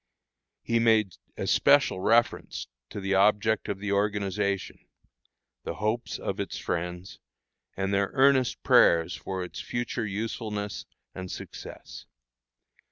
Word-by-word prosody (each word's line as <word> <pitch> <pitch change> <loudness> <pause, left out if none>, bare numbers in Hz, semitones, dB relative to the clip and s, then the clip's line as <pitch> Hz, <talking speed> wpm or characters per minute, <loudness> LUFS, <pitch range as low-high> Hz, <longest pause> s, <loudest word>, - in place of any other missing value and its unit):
He 115 0 +1
made 110 -5 +3 0.2
especial - - +3
reference 115 +5 +1 0.2
to - - -6
the 100 0 -1
object 105 +2 +3
of 100 - -2
the 100 +1 -4
organization, 100 -1 -1 0.8
the - - -4
hopes 110 +3 -2
of - - -4
its - - -3
friends, 90 +2 -4 0.6
and 95 +1 -1
their 100 0 +2
earnest 135 -2 +3
prayers 85 0 +5
for 95 +2 -4
its 90 - -8
future 120 -1 -3
usefulness 105 0 -4 0.3
and 95 0 -7
success. - - -9
100 Hz, 115 wpm, -27 LUFS, 95-110 Hz, 0.8 s, prayers